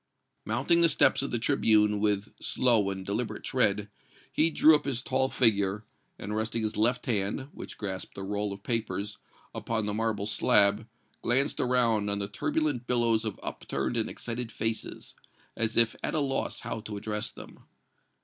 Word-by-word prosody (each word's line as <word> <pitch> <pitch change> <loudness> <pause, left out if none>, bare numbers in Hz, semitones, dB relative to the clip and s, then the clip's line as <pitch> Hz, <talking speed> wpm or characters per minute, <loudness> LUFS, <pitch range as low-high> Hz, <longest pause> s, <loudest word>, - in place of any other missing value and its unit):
Mounting 170 0 +2
the 170 - +5
steps 140 - +4
of 140 - -2
the 120 - -1
tribune 110 -4 +3
with 105 0 0
slow 115 -6 +2
and 95 -1 -5
deliberate 110 +4 -3
tread, 105 -5 +2 0.4
he 160 +2 +3
drew 160 0 +6
up 150 -1 +3
his 130 -2 -2
tall 130 - +1
figure, 105 -4 +2 0.3
and 105 +1 -5
resting 110 +1 -1
his 110 - -2
left 120 +3 +2
hand, 110 +3 -1
which - - -9
grasped 95 -3 -6
a 95 - -5
roll 105 +1 -2
of 100 0 -8
papers, 105 -3 -2 0.3
upon 110 -2 -2
the 105 - -2
marble 110 -2 -1
slab, 105 0 +3 0.3
glanced 135 +4 +1
around 115 -5 +2
on 100 - -1
the 100 0 -2
turbulent 125 +4 -1
billows 115 -2 +2
of 110 -3 -4
upturned - - -3
and 110 -2 0
excited 120 0 -5
faces, 110 +1 -3 0.4
as 115 0 -1
if 115 -1 +5
at - - -2
a - - +2
loss 135 -2 -1
how 115 - -4
to 105 -1 -6
address 105 +1 -3
them. - - -12
110 Hz, 170 wpm, -28 LUFS, 105-125 Hz, 0.4 s, drew